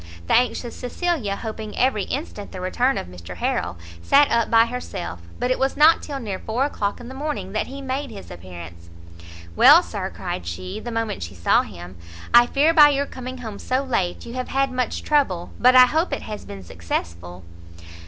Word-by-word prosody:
The - - 0
anxious 245 0 +1
Cecilia, 250 - -2
hoping 220 -1 -7
every 245 -5 +1
instant 255 -8 -5
the 185 - -7
return 245 +9 0
of - - -3
Mr 90 0 -10
Harrel, 90 0 -2 0.2
sat 285 +1 +4
up 230 -1 +2
by 225 0 +6
herself: 230 - -6 0.2
but 250 - -1
it 255 - 0
was 270 +1 0
not 310 +3 +6
till 280 -2 -5
near 205 -6 -5
four 240 +5 -1
o'clock 205 -8 -2
in 240 - -10
the 260 - -8
morning 265 -9 -4
that 215 - -2
he 275 +1 -8
made 270 +1 -3
his 205 -4 -10
appearance. 85 -1 -11 0.7
"Well, - - +8
sir," - - -5
cried 85 - -5
she, 90 +2 -5
the 240 - -6
moment 225 - -2
she 85 +2 -7
saw 85 - +3
him, 90 +1 -10 0.4
"I 240 0 +8
fear 295 +6 +3
by 300 -3 +8
your 280 0 0
coming 255 -1 -8
home 210 -2 -7
so 260 +2 -1
late 190 -10 -2
you 235 - -8
have 255 0 -4
had 270 0 0
much 255 -2 -2
trouble, 230 - +1
but 250 +1 +5
I 255 0 +10
hope 320 +7 0
it - - -3
has 210 -1 -7
been 100 -1 -9
successful?" 85 +1 -5
230 Hz, 200 wpm, -22 LUFS, -, 0.7 s, I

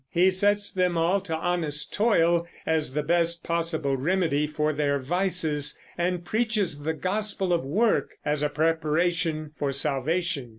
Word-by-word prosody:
He 180 +4 +3
sets 205 +2 +3
them 180 -2 +1
all 175 +4 +2
to 170 -4 -4
honest 160 -3 0
toil 170 -6 +2 0.2
as 155 -4 0
the 150 - 0
best 170 +1 +1
possible 165 -4 -1
remedy 150 0 0
for 150 0 -1
their 145 -1 0
vices, 160 -1 -1 0.2
and 175 0 -2
preaches 215 -9 0
the 160 +2 -2
gospel 195 +1 0
of 170 - 0
work 205 - 0
as 150 0 0
a 150 - +1
preparation 160 0 0
for 140 -1 0
salvation. 150 +1 -1
165 Hz, 145 wpm, -26 LUFS, 150-180 Hz, 0.2 s, He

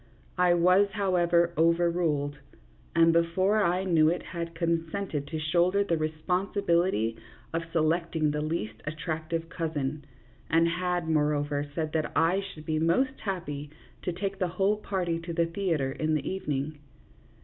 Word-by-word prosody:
I 180 -1 +5
was, 180 +4 +5
how 200 -2 0
ever, 170 -1 +3
overruled, 165 -3 +1 0.6
and 165 0 +5
before 185 +5 +2
I 180 +1 +1
knew 165 -4 +4
it 175 +1 -1
had 170 -1 -6
consented 165 -2 -2
to 160 - -4
shoulder 175 +6 +2
the 170 -4 0
responsibility 170 - 0 0.4
of 165 - 0
selecting 160 -1 +1
the 150 0 -2
least 115 -9 -3
attractive 160 +1 -3
cousin, 155 -4 -3 0.5
and 165 +1 +4
had, 180 0 -1
moreover, 145 -2 +1
said 155 -2 -2
that 155 -2 -1
I 175 +4 +3
should 170 -6 -9
be 155 0 0
most 260 +12 +1
happy 150 -7 -4 0.3
to 180 - -2
take 195 +2 -4
the 185 - +1
whole 195 +4 +1
party 180 -5 -2
to 170 0 -6
the 170 0 +2
theatre 165 -6 -1
in 155 +3 0
the 150 - -2
evening. 150 -5 -3
165 Hz, 150 wpm, -28 LUFS, 155-180 Hz, 0.6 s, I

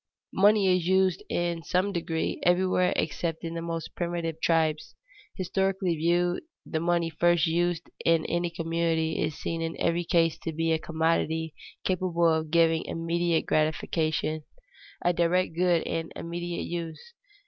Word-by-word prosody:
Money 200 -1 +5
is 175 -2 -1
used, 190 -1 +3
in 170 -1 -1
some 185 +4 0
degree, 165 -2 -2
everywhere 180 0 +3
except 165 +1 -2
in 165 0 -4
the 165 - -4
most 165 -1 -4
primitive 170 -2 -3
tribes. 160 -2 +1 0.4
Historically 190 -1 0
viewed, 175 +2 +1 0.2
the 160 - -2
money 170 0 +1
first 175 +1 +3
used 175 0 0 0.2
in 165 -1 +3
any 175 +1 0
community 165 -1 -1
is 155 - -2
seen 165 0 -3
in 165 0 -4
every 170 +1 +1
case 165 -2 +2
to 165 - -4
be 165 +1 0
a 160 - +2
commodity 160 0 0 0.3
capable 175 -2 +1
of 160 -1 -1
giving 165 0 +3
immediate 170 0 0
gratification, 155 0 0 0.6
a 175 - +4
direct 175 0 +1
good 175 -1 +2
in 165 0 -3
immediate 175 0 -4
use. 170 - -6
170 Hz, 145 wpm, -27 LUFS, 165-175 Hz, 0.6 s, Money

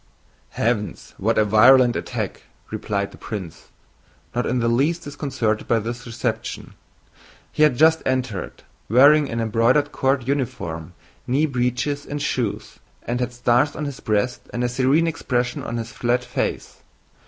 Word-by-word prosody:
"Heavens! 110 -2 -1
what 110 +4 +1
a 110 - +4
virulent 120 +4 +6
attack!" - - -4 0.3
replied 100 -1 -2
the - - -15
prince, 95 -8 -7 0.7
not 120 +1 -1
in 125 - 0
the 115 -1 +1
least 145 +9 +1
disconcerted 130 -7 -2
by 115 - +3
this 120 +3 -5
reception. 115 - -4 0.8
He - - -3
had 150 -5 +5
just 160 +2 +5
entered, 130 -6 -3 0.3
wearing 140 +5 +6
an 115 - -3
embroidered 115 +6 +2
court 130 -2 0
uniform, 90 - -3 0.3
knee 140 +5 +2
breeches, 135 +2 -1
and 145 - -4
shoes, 120 -7 -3 0.2
and 120 +1 -2
had 125 0 -1
stars 125 +3 +2
on 150 - -3
his 140 -2 -6
breast 110 +3 -1
and 120 - -2
a 125 - +1
serene 135 +6 +2
expression 125 -6 -1
on 120 - -4
his 115 -1 -5
flat 120 +2 0
face. - - -4
125 Hz, 150 wpm, -22 LUFS, 115-135 Hz, 0.8 s, virulent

